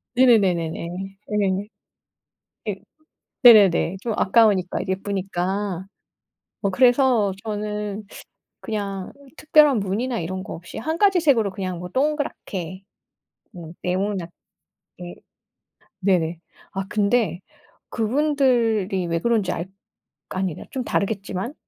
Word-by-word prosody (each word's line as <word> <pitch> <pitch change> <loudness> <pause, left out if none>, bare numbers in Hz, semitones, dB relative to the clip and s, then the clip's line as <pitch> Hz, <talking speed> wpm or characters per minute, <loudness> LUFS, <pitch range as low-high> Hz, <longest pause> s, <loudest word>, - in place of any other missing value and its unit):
네네네네네. 185 -10 +3 0.4
네. 200 -1 0 1.0
네. 210 - -2 0.7
네네네. 200 -6 +7
좀 230 - -2
아까우니까 195 -3 +3
예쁘니까. 190 -1 -2 0.7
뭐 200 - 0
그래서 245 -1 +4
저는 210 -1 -4 0.6
그냥 200 -3 -4 0.3
특별한 300 -5 +5
무늬나 220 +6 -2
이런 185 +3 -4
거 - - -7
없이 175 +1 -9
1 315 +8 -2
가지 390 -1 +4
색으로 245 - +3
그냥 185 -2 -4
뭐 180 +1 -7
동그랗게 200 - -2 0.7
음 165 -2 -9
네모낳 185 -1 -2 0.7
예 175 0 -7 0.9
네네. 175 -4 +1 0.3
아 195 0 -3
근데 210 -2 +1 0.5
그분들이 230 -6 +1
왜 165 -1 -1
그런지 220 -3 +1
알 170 +1 -4 0.6
아니다 185 -3 -3
좀 260 - -3
다르겠지만 200 +2 -2
200 Hz, 220 characters per minute, -23 LUFS, 185-235 Hz, 1.0 s, 네네네